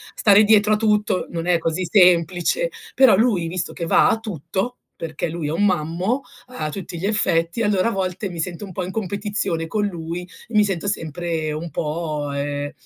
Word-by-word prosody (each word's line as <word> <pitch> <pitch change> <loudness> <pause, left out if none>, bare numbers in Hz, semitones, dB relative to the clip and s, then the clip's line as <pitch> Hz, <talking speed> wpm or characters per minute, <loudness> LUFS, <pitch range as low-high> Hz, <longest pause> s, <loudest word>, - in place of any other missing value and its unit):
stare 205 0 +5
dietro 215 0 +4
a - - +3
tutto 210 -3 +1
non 165 -1 -4
è 175 -1 +4
così 165 +2 -2
semplice. 180 - +3 0.3
Però 260 -8 +6
lui 210 -8 +2
visto 175 +1 0
che 170 - -4
va - - +4
a 225 - +1
tutto, 195 - -4 0.3
perché 165 +1 -3
lui 165 -2 -4
è - - -2
un 200 +6 +1
mammo, 180 - 0 0.3
a 155 -12 -4
tutti 175 +1 -6
gli 180 - -4
effetti, 175 -2 +2
allora 205 0 +2
a - - -2
volte 190 0 -3
mi 175 -2 -8
sento 175 +3 -3
un 195 - -8
po' 185 +1 -4
in 185 - -6
competizione 200 -5 -1
con 210 +4 -1
lui 170 -2 -4 0.3
e 230 - -14
mi 210 - +6
sento 195 -1 -2
sempre 165 -3 -2
un 155 +3 -5
po', 150 -2 -3
ehm, 145 0 -3
180 Hz, 195 wpm, -21 LUFS, 165-205 Hz, 0.3 s, Però